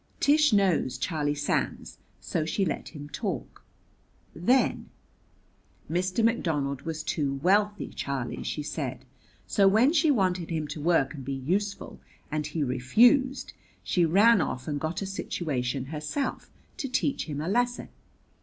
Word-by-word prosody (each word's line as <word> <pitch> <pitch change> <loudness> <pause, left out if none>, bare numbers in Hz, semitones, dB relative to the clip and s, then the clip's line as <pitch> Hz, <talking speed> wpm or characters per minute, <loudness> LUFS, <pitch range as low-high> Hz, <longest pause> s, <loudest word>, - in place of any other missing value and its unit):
Tish 300 0 +4
knows 190 - +2
Charlie 145 +1 -1
Sands, 145 - -2 0.2
so 160 - -2
she 180 +5 0
let - - -3
him 145 -1 -7
talk. 145 - -5 0.7
Then: 245 +11 +1 1.0
"Mr. 185 +6 0
McDonald 150 - 0
was 160 -1 -4
too 140 -3 -1
wealthy, 205 +3 +2
Charlie," 135 -4 -4
she 150 - -3
said; 130 -4 -4 0.4
"so 200 -1 +3
when 225 +9 +4
she 315 -1 +3
wanted 185 - +1
him 160 -3 -2
to 150 +1 -5
work 160 -3 +2
and 140 -4 -8
be 135 +2 -3
useful, 190 +10 -2 0.3
and 155 0 -1
he 160 - -2
refused, 240 - +3 0.3
she 180 - +1
ran 200 +6 +5
off 130 0 -3
and 145 -2 -2
got 160 +6 -3
a - - -3
situation 140 -9 -3
herself 155 - -4 0.3
to 270 - -3
teach 275 +2 0
him 145 -3 -5
a 155 - -3
lesson. 245 +4 0
165 Hz, 145 wpm, -27 LUFS, 145-205 Hz, 1.0 s, ran